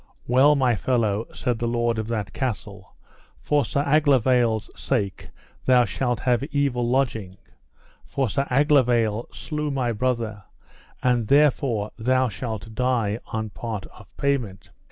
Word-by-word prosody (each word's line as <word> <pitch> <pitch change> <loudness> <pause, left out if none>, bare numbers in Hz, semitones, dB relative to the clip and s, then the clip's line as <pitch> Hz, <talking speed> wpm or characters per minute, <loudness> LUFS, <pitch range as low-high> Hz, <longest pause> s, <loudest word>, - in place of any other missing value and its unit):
Well, 135 +5 +5
my 130 -4 +2
fellow, 110 -2 0
said 120 -2 -2
the 120 - -1
lord 120 -1 0
of 110 - -3
that 110 -4 -3
castle, 105 -6 -5 0.4
for 145 -1 +1
Sir 140 - -1
Aglovale's 130 -6 +3
sake 100 -8 -2 0.4
thou 125 -1 +5
shalt 120 +3 -2
have 125 -1 +2
evil 140 -5 0
lodging, 115 -8 -1 0.7
for 135 -1 -1
Sir 135 +6 -1
Aglovale 125 -5 +2
slew 150 -1 -4
my 130 -4 -1
brother, 115 -3 -2 0.6
and 120 -3 +2
therefore 135 -6 +2
thou 130 +2 +2
shalt 110 -1 -6
die 115 -3 0
on 110 -1 -4
part 110 -5 -5
of 110 - -15
payment. 125 -9 -2
120 Hz, 135 wpm, -24 LUFS, 110-130 Hz, 0.7 s, Well